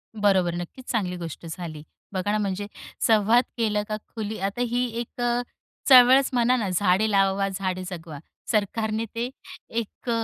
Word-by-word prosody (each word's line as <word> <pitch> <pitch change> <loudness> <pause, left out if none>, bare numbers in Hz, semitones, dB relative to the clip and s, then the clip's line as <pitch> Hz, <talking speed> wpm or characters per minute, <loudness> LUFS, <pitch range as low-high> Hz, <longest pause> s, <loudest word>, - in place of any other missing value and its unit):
बरोबर, 190 -5 +2
नक्कीच 175 +9 -7
चांगली 190 -6 -1
गोष्ट 170 -1 -7
झाली. 160 -3 -7 0.3
बघा 190 +2 -1
ना, 210 - +2
म्हणजे 205 -1 -2 0.4
संवाद 225 +2 +5
केला 210 -3 +1
का 215 - -1 0.2
खुली 215 -1 -4
आता 195 +5 -2
ही 245 +2 0
एक 240 +1 -6 0.7
चळवळच 260 +1 +8
म्हणा 245 0 +3
ना, 210 -5 -1
झाडे 185 +3 +2
लावा 195 0 +2
झाडे 185 -1 -3
जगवा. 160 -5 -8 0.3
सरकारने 220 +1 0
ते, 235 +2 -1 0.4
एक 230 +1 -5
205 Hz, 145 wpm, -25 LUFS, 185-230 Hz, 0.7 s, चळवळच